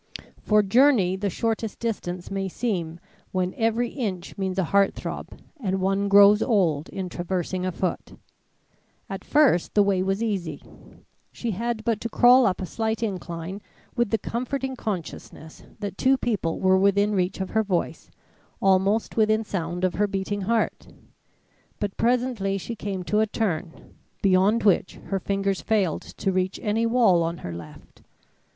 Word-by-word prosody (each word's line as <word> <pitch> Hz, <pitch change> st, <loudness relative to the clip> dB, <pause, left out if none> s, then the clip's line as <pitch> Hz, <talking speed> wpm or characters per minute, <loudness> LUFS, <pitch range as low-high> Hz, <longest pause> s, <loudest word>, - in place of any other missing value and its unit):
For 210 Hz, -1 st, +3 dB
journey 210 Hz, -3 st, +4 dB
the 200 Hz, +1 st, -2 dB
shortest 225 Hz, +2 st, -2 dB
distance 180 Hz, -6 st, -4 dB
may 195 Hz, 0 st, -2 dB
seem 175 Hz, -6 st, -3 dB, 0.3 s
when 185 Hz, -1 st, -1 dB
every 230 Hz, +1 st, 0 dB
inch 200 Hz, -10 st, -4 dB
means 190 Hz, -1 st, -3 dB
a 190 Hz, -, +2 dB
heart 195 Hz, +3 st, +2 dB
throb -, -, -7 dB, 0.2 s
and 190 Hz, -6 st, -1 dB
one 195 Hz, +1 st, +1 dB
grows 205 Hz, +1 st, +7 dB
old 175 Hz, -, +1 dB
in 190 Hz, -1 st, -4 dB
traversing 180 Hz, +1 st, -3 dB
a -, -, -1 dB
foot. 180 Hz, +1 st, -3 dB, 1.0 s
At 195 Hz, -, -5 dB
first 285 Hz, -, +3 dB
the 205 Hz, -, +6 dB
way 195 Hz, -2 st, +1 dB
was 195 Hz, +3 st, -1 dB
easy; 180 Hz, -9 st, -3 dB, 0.7 s
she 235 Hz, -, -4 dB
had 230 Hz, +2 st, -3 dB
but 225 Hz, -2 st, 0 dB
to 230 Hz, -, -3 dB
crawl 245 Hz, +2 st, +6 dB
up 190 Hz, -, -1 dB
a -, -, -2 dB
slight 220 Hz, +3 st, -2 dB
incline 185 Hz, -2 st, -5 dB, 0.3 s
with 240 Hz, -2 st, +1 dB
the 225 Hz, -, +1 dB
comforting 260 Hz, +4 st, -3 dB
consciousness 170 Hz, -6 st, -6 dB, 0.2 s
that 200 Hz, -1 st, -5 dB
two 265 Hz, +1 st, +4 dB
people 210 Hz, -10 st, -1 dB
were 190 Hz, 0 st, +4 dB
within 200 Hz, +2 st, +3 dB
reach 185 Hz, -1 st, 0 dB
of 190 Hz, -, -4 dB
her 220 Hz, -, +2 dB
voice, 195 Hz, -5 st, -2 dB, 0.5 s
almost 195 Hz, +4 st, +2 dB
within 215 Hz, 0 st, +3 dB
sound 180 Hz, -3 st, -4 dB
of 185 Hz, -, +2 dB
her 210 Hz, +1 st, +1 dB
beating 200 Hz, +1 st, -3 dB
heart. 230 Hz, -1 st, 0 dB, 0.9 s
But 205 Hz, -2 st, -3 dB
presently 235 Hz, -5 st, 0 dB
she 230 Hz, +4 st, -6 dB
came 195 Hz, -3 st, -4 dB
to 210 Hz, +4 st, 0 dB
a 220 Hz, -, +2 dB
turn, 180 Hz, -6 st, -3 dB, 0.3 s
beyond 195 Hz, +4 st, +3 dB
which 195 Hz, -3 st, +2 dB
her 195 Hz, -, -4 dB
fingers 195 Hz, 0 st, -1 dB
failed 200 Hz, -7 st, 0 dB
to 195 Hz, -, -3 dB
reach 185 Hz, 0 st, -1 dB
any 225 Hz, +1 st, +1 dB
wall 230 Hz, -8 st, +4 dB
on 165 Hz, +1 st, -2 dB
her 85 Hz, -, -4 dB
left. 85 Hz, 0 st, -12 dB
200 Hz, 160 wpm, -25 LUFS, 185-225 Hz, 1.0 s, grows